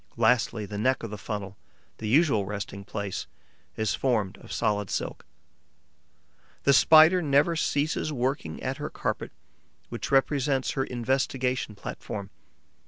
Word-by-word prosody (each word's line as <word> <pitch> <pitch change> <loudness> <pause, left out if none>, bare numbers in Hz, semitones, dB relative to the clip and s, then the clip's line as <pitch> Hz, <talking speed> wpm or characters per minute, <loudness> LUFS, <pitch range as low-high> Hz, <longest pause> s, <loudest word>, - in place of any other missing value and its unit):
Lastly, 115 -1 +2
the 105 0 -6
neck 130 +4 +1
of 115 - -5
the - - -4
funnel, 100 -1 -5 0.4
the 110 - -4
usual 130 -4 +4
resting 100 0 -5
place, 100 -1 -4 0.5
is 110 -1 0
formed 110 -8 0
of - - -13
solid 105 -2 0
silk. - - -4 1.4
The 140 - +5
Spider 160 +6 +7
never 145 +2 +3
ceases 155 0 0
working 125 - -2
at - - -2
her - - -4
carpet, - - -3 0.6
which - - -5
represents 135 -1 +2
her 135 - -1
investigation 125 -1 -1
platform. 100 0 -6
125 Hz, 130 wpm, -27 LUFS, 105-140 Hz, 1.4 s, Spider